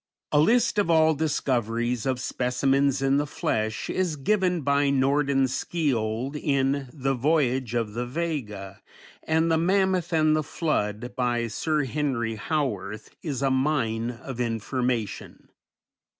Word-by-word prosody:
A 145 Hz, -, +4 dB
list 230 Hz, +5 st, +3 dB
of 200 Hz, -, +1 dB
all 160 Hz, -1 st, +5 dB
discoveries 125 Hz, -6 st, -1 dB
of 130 Hz, -1 st, 0 dB
specimens 135 Hz, +2 st, +1 dB
in 135 Hz, +1 st, +3 dB
the 145 Hz, +1 st, 0 dB
flesh 110 Hz, -4 st, -2 dB
is 180 Hz, -4 st, -1 dB
given 180 Hz, +3 st, +1 dB
by 140 Hz, 0 st, +2 dB
Nordenskiold 135 Hz, -2 st, 0 dB
in 140 Hz, -2 st, 0 dB
"The 135 Hz, 0 st, -1 dB
Voyage 130 Hz, -3 st, +1 dB
of 115 Hz, -3 st, -1 dB
the 120 Hz, +2 st, -3 dB
Vega" 120 Hz, -, -4 dB, 0.4 s
and 160 Hz, +1 st, +1 dB
"The 160 Hz, -, +3 dB
Mammoth 185 Hz, 0 st, +1 dB
and 155 Hz, -1 st, +3 dB
the 155 Hz, -, +1 dB
Flood" 125 Hz, -7 st, -2 dB
by 120 Hz, -2 st, 0 dB
Sir 150 Hz, +7 st, -1 dB
Henry 130 Hz, -5 st, -1 dB
Howorth, 110 Hz, -, -3 dB
is 140 Hz, -4 st, -3 dB
a 135 Hz, -, +2 dB
mine 130 Hz, -5 st, 0 dB
of 125 Hz, +1 st, -7 dB
information. 120 Hz, 0 st, -2 dB
135 Hz, 130 wpm, -26 LUFS, 120-155 Hz, 0.4 s, all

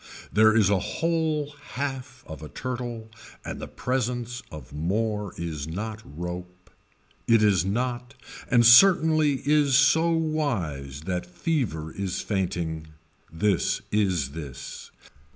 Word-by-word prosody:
There 110 Hz, +1 st, +5 dB
is 105 Hz, -3 st, +4 dB
a 100 Hz, -, +3 dB
whole 155 Hz, -, -1 dB, 0.2 s
half 130 Hz, -1 st, -4 dB
of 80 Hz, -1 st, -9 dB
a 75 Hz, -, -8 dB
turtle 120 Hz, -3 st, -5 dB, 0.3 s
and -, -, -6 dB
the -, -, -5 dB
presence 125 Hz, -1 st, -2 dB
of 75 Hz, -2 st, -10 dB
more 105 Hz, +5 st, -1 dB
is 80 Hz, -4 st, -4 dB
not 110 Hz, +6 st, -5 dB
rope, 90 Hz, +4 st, -8 dB, 0.6 s
it 115 Hz, -2 st, +5 dB
is 100 Hz, -5 st, +4 dB
not 120 Hz, +4 st, -2 dB, 0.3 s
and 120 Hz, -2 st, +5 dB
certainly 155 Hz, +1 st, +6 dB
is 145 Hz, -2 st, +3 dB
so 160 Hz, +5 st, +5 dB
wise 115 Hz, -, -1 dB
that 90 Hz, +1 st, -3 dB
fever 90 Hz, -, -2 dB
is 95 Hz, -2 st, -3 dB
fainting. 85 Hz, -5 st, -2 dB, 0.4 s
This 95 Hz, +2 st, +1 dB
is 95 Hz, -10 st, +1 dB
this. 70 Hz, -4 st, -8 dB
110 Hz, 120 wpm, -26 LUFS, 85-130 Hz, 0.6 s, certainly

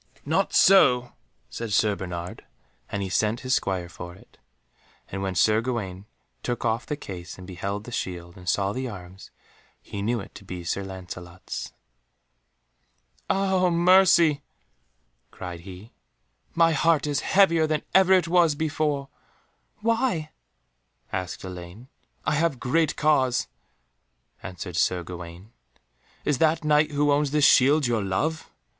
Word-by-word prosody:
"Not -, -, +1 dB
so," 125 Hz, -11 st, +5 dB, 0.4 s
said 115 Hz, -2 st, -5 dB
Sir 105 Hz, 0 st, +3 dB
Bernard, 90 Hz, -2 st, -6 dB, 0.5 s
and 100 Hz, -2 st, -3 dB
sent 110 Hz, +2 st, +1 dB
his 130 Hz, 0 st, -1 dB
Squire 95 Hz, -3 st, 0 dB
for 85 Hz, 0 st, -9 dB
it. 95 Hz, -, -21 dB, 0.7 s
And 95 Hz, -, -5 dB
when 95 Hz, -1 st, -2 dB
Sir 110 Hz, +6 st, +3 dB
Gawaine 105 Hz, -6 st, -4 dB, 0.3 s
took 120 Hz, -1 st, -3 dB
off 115 Hz, +1 st, 0 dB
the 150 Hz, -, -2 dB
case 90 Hz, -8 st, -8 dB
and 95 Hz, -, -10 dB
beheld 100 Hz, +2 st, -4 dB
the 120 Hz, -, -10 dB
shield, 85 Hz, -5 st, -5 dB
and 90 Hz, -1 st, -6 dB
saw 100 Hz, 0 st, +1 dB
the 130 Hz, +1 st, -3 dB
arms, 95 Hz, -2 st, -11 dB, 0.5 s
he 100 Hz, -, -7 dB
knew 115 Hz, +3 st, 0 dB
it 95 Hz, -, -10 dB
to -, -, -12 dB
be 90 Hz, -2 st, -7 dB
Sir 100 Hz, +4 st, -2 dB
Lancelot's. 90 Hz, -2 st, -8 dB, 1.6 s
"Ah 190 Hz, -2 st, +2 dB
mercy," 170 Hz, -3 st, +5 dB, 0.9 s
cried 90 Hz, -2 st, -8 dB
he, 95 Hz, +5 st, -11 dB, 0.6 s
"my 165 Hz, 0 st, +5 dB
heart 160 Hz, 0 st, +2 dB
is 145 Hz, -1 st, 0 dB
heavier 170 Hz, -5 st, +3 dB
than 155 Hz, -1 st, -1 dB
ever 190 Hz, 0 st, +6 dB
it 180 Hz, -3 st, +3 dB
was 170 Hz, -3 st, +4 dB
before!" 150 Hz, -2 st, -1 dB, 0.7 s
"Why?" 225 Hz, -9 st, 0 dB, 0.8 s
asked 95 Hz, -2 st, -4 dB
Elaine. 90 Hz, +6 st, -9 dB, 0.4 s
"I -, -, +1 dB
have 150 Hz, -3 st, +1 dB
great 155 Hz, +4 st, +1 dB
cause," 130 Hz, -5 st, +2 dB, 1.0 s
answered 90 Hz, -1 st, -7 dB
Sir 90 Hz, +2 st, +1 dB
Gawaine. 85 Hz, +3 st, -9 dB, 0.7 s
"Is 145 Hz, -3 st, +1 dB
that 160 Hz, 0 st, +2 dB
Knight 150 Hz, 0 st, +3 dB
who 145 Hz, 0 st, +1 dB
owns 145 Hz, 0 st, +2 dB
this 150 Hz, 0 st, +3 dB
shield 140 Hz, +3 st, +5 dB
your 120 Hz, -3 st, +1 dB
love?" 150 Hz, +13 st, -2 dB
120 Hz, 140 wpm, -25 LUFS, 95-155 Hz, 1.6 s, ever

